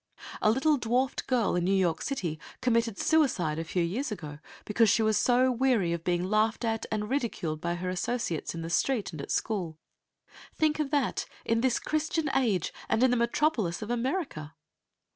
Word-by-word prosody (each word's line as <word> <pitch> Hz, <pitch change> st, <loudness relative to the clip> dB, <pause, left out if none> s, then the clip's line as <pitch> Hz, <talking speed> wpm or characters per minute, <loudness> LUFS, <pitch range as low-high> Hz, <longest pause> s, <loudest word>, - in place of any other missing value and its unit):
A 215 Hz, -, +4 dB
little 285 Hz, +6 st, +3 dB
dwarfed 250 Hz, +2 st, 0 dB
girl 245 Hz, -7 st, +1 dB
in 175 Hz, -, +1 dB
New 195 Hz, +2 st, +2 dB
York 175 Hz, -4 st, +1 dB
City 175 Hz, -, -3 dB, 0.2 s
committed 230 Hz, -3 st, +1 dB
suicide 190 Hz, -, +2 dB
a -, -, -2 dB
few 170 Hz, +2 st, -1 dB
years 225 Hz, +11 st, -2 dB
ago 150 Hz, -7 st, -6 dB, 0.3 s
because 220 Hz, +1 st, +3 dB
she 220 Hz, -, +3 dB
was 215 Hz, 0 st, +2 dB
so 255 Hz, +3 st, +3 dB
weary 240 Hz, -8 st, +2 dB
of 170 Hz, -1 st, -4 dB
being 175 Hz, 0 st, 0 dB
laughed 215 Hz, +4 st, +1 dB
at 225 Hz, -1 st, -1 dB
and 210 Hz, -1 st, -1 dB
ridiculed 210 Hz, -, -2 dB
by 170 Hz, 0 st, -1 dB
her 180 Hz, +1 st, -4 dB
associates 185 Hz, -4 st, -2 dB
in 165 Hz, -, -5 dB
the 165 Hz, -, -5 dB
street 230 Hz, +2 st, +1 dB
and 155 Hz, -4 st, -6 dB
at -, -, -8 dB
school. 180 Hz, -8 st, -2 dB, 0.8 s
Think 310 Hz, -1 st, +1 dB
of 300 Hz, -2 st, 0 dB
that, 285 Hz, -3 st, 0 dB, 0.2 s
in 230 Hz, 0 st, +1 dB
this 255 Hz, -2 st, +2 dB
Christian 310 Hz, 0 st, -1 dB
age, 215 Hz, -10 st, +1 dB, 0.2 s
and 230 Hz, -, +2 dB
in 260 Hz, -, +5 dB
the -, -, +3 dB
metropolis 235 Hz, -, 0 dB
of 215 Hz, -, -5 dB
America! 240 Hz, -, -2 dB
225 Hz, 185 wpm, -29 LUFS, 175-255 Hz, 0.8 s, in